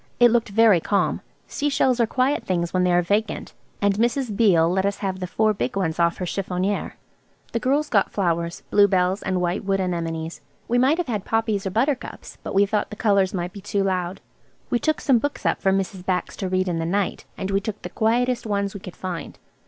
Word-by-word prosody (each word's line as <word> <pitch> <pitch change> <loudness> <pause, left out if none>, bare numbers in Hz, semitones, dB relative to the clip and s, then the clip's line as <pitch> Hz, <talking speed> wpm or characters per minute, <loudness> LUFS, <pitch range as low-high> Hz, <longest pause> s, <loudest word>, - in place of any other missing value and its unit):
It 240 -1 +7
looked 235 -1 +1
very 215 -3 +5
calm. 200 +4 0 0.2
Sea 290 - -2
shells 260 -3 +2
are 230 - +3
quiet 260 +5 +1
things 170 -2 -1
when 185 -1 +2
they 180 - +3
are 175 0 +3
vacant, 205 +5 -1 0.3
and 200 0 +4
Mrs. 235 0 0
Beale 185 -7 +4
let 190 +2 +1
us 200 0 0
have 190 -2 -3
the 180 - -3
four 215 +3 +2
big 200 - -3
ones 175 -4 -1
off 170 0 +2
her 180 - -3
chiffonnier. 190 +2 -2 0.6
The 230 - -1
girls 280 +6 +1
got 200 -7 +2
flowers–bluebells 180 +2 +1
and 185 -2 -1
white 175 +1 -1
wood 195 0 0
anemones. 165 -3 -3 0.3
We 245 +1 +2
might 270 +6 +4
have 355 - -1
had 215 -7 -3
poppies 220 -3 0
or - - 0
buttercups, 255 +7 -2
but - - -6
we 200 +1 +5
thought 210 +1 -1
the - - -7
colours 200 -3 +2
might 175 -1 -3
be 200 - -9
too 200 0 -1
loud. 185 -1 -2 0.5
We 240 - +2
took 310 +3 0
some 260 -5 +4
books 290 +4 -4
up - - +1
for 195 - +3
Mrs. 190 -1 -2
Bax 185 -1 -1
to 190 - -3
read 185 0 +1
in 170 -2 -1
the 165 - -1
night. 195 +1 -1
And 190 - -3
we 195 0 +1
took 215 0 -5
the - - -5
quietest 240 +2 +1
ones 200 -1 -1
we 200 - -7
could 185 -2 -10
find. 180 -3 -6
200 Hz, 220 wpm, -23 LUFS, 180-225 Hz, 0.6 s, It